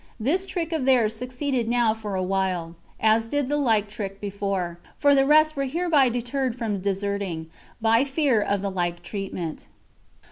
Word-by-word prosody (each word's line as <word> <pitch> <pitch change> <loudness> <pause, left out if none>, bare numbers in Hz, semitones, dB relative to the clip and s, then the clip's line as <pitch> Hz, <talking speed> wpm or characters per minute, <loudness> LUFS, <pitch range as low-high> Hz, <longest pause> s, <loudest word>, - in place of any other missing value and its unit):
This 340 - 0
trick 335 -3 -3
of 305 -5 -1
theirs 235 -5 +3
succeeded 250 +1 -2
now 235 -2 +3
for 215 -3 -5
a 185 - 0
while, 185 -3 -1 0.3
as 220 +1 +3
did 285 +1 -1
the 295 - +1
like 225 -7 +2
trick 200 -1 -6
before; 195 -4 -3 0.2
for 285 -1 +4
the 270 -1 +4
rest 310 +1 +5
were 275 -1 -1
hereby 300 -2 +3
deterred 245 +1 -2
from 220 -5 -2
deserting, 195 -4 -2 0.3
by 225 +2 +4
fear 275 -5 +2
of 200 -1 0
the 200 - -1
like 175 -2 -2
treatment. 190 -5 -5
225 Hz, 170 wpm, -25 LUFS, 195-270 Hz, 0.3 s, rest